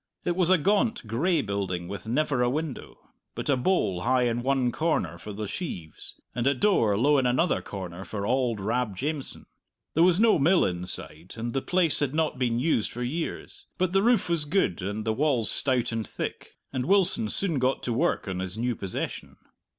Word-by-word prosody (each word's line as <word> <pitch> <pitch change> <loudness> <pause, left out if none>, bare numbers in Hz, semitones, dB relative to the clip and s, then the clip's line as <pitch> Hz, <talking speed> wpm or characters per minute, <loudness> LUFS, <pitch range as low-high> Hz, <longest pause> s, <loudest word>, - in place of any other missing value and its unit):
It 175 - 0
was 180 -1 +2
a 185 - +6
gaunt, 205 - +1
gray 150 +10 +1
building 95 -4 -3
with 100 +3 -7
never 135 +1 +1
a 120 - +3
window, 150 0 -4 0.4
but - - -4
a - - +4
bole 125 - +1
high 125 +3 +2
in 120 0 0
one 130 -1 +1
corner 100 - -1
for 105 - -8
the 105 +1 -5
sheaves, 90 - -6
and 120 +1 -1
a 140 - +3
door 120 - +2
low 140 +5 +4
in 130 - +1
another 130 +9 +1
corner 95 -2 -7
for 100 +1 -5
auld 125 -2 +1
Rab 110 +1 -1
Jamieson. 145 +3 -4 0.5
There 165 - +2
was 180 +1 +5
no 225 -6 +5
mill 170 +6 +4
inside, 90 -1 -5
and 115 +1 -4
the 135 - 0
place 180 -2 +2
had 145 -1 -1
not 155 -5 0
been 120 -2 +1
used 125 -4 +1
for 120 - -5
years. 160 +7 -5
But 185 0 0
the 195 - +4
roof 235 +2 +3
was 170 -3 0
good, 145 - 0
and 105 +3 -4
the 110 - +1
walls 130 -5 +3
stout 130 -4 +2
and 115 -2 -3
thick, - - -6 0.2
and 130 0 -2
Wilson 200 +3 +3
soon 170 -8 +2
got 130 +1 0
to 120 - -1
work 165 -1 0
on 95 -1 -3
his 95 +2 -5
new 120 +1 -1
possession. 95 -3 -5
125 Hz, 200 wpm, -27 LUFS, 105-160 Hz, 0.5 s, a